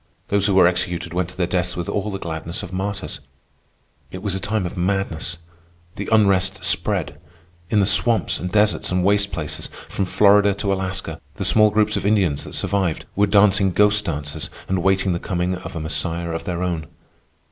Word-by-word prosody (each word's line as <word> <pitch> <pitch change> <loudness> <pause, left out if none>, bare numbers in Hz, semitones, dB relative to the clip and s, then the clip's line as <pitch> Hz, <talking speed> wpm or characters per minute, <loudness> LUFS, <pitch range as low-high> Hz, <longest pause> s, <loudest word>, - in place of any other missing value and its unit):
Those 100 0 +2
who 100 - +2
were 95 -2 +7
executed 90 -1 -2
went 90 -1 -1
to 90 - -15
their 90 - +1
deaths 90 0 -1
with 85 - -3
all 100 +1 -2
the 95 - -4
gladness 85 +1 -5
of 95 -1 -8
martyrs. 100 +1 -4 0.9
It 95 +1 -8
was 100 -3 -1
a 95 - -1
time 105 -1 -1
of 90 - -5
madness. 90 -2 -2 0.6
The 100 - -5
unrest 100 -3 +2
spread. - - -1 0.5
In 105 - +3
the - - +3
swamps 110 +4 +2
and 90 0 -4
deserts 105 -1 +2
and 90 0 +1
waste 100 +1 +2
places, 75 +1 -4 0.2
from 95 - -1
Florida 100 +1 +4
to 100 -1 -1
Alaska, 95 0 -4
the - - -3
small 105 -1 +5
groups 105 +1 +1
of - - -3
Indians 95 -9 +1
that - - -7
survived 95 -5 -1
were 105 +1 +3
dancing 100 -1 +4
ghost 105 +3 +4
dances 75 0 -4 0.2
and 95 -1 0
waiting 95 0 +2
the 85 - -2
coming 90 -1 -1
of 90 +1 -7
a - - -3
Messiah 85 +2 -2
of 80 - -4
their 90 0 -2
own. 85 -3 -2
95 Hz, 190 wpm, -21 LUFS, 85-100 Hz, 0.9 s, were